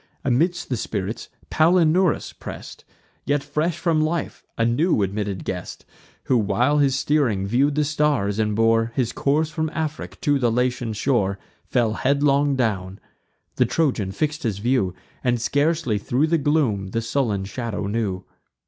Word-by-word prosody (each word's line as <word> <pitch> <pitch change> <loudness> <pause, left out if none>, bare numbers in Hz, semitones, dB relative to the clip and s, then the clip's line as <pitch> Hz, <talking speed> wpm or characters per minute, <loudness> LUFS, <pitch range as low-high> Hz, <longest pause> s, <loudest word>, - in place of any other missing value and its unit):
Amidst 165 +8 +1
the 125 - -1
spirits, 105 0 -4 0.2
Palinurus 170 +1 +3
press'd, - - -9 0.4
Yet 145 -1 0
fresh 155 +4 -1
from 165 -3 +1
life, 160 +1 -2
a 115 - +2
new 120 - +2
admitted 100 -1 -3
guest, 90 -2 -5 0.4
Who, 125 - +2
while 120 +8 +2
he 140 -1 +4
steering 135 -7 +1
view'd 135 +7 +2
the 150 - +2
stars, 145 -9 +1
and 105 -1 +1
bore 115 +1 +2
His 125 -3 0
course 155 +3 0
from 160 0 -2
Afric 155 -1 -4
to 145 -6 +2
the 120 -3 +2
Latian 125 -1 0
shore, 105 -4 0 0.3
Fell 115 -4 +1
headlong 140 +5 +2
down. 100 -6 -1 0.6
The - - +4
Trojan 125 -12 0
fix'd 150 +9 -2
his 110 -5 -2
view, 105 -4 0 0.3
And 120 -1 +1
scarcely 145 -2 +1
thro' 125 +8 +1
the 165 +1 +1
gloom 135 -10 +1
the 115 +5 -2
sullen 115 -5 -1
shadow 110 0 -4
knew. 100 -3 -2
125 Hz, 150 wpm, -23 LUFS, 105-150 Hz, 0.6 s, he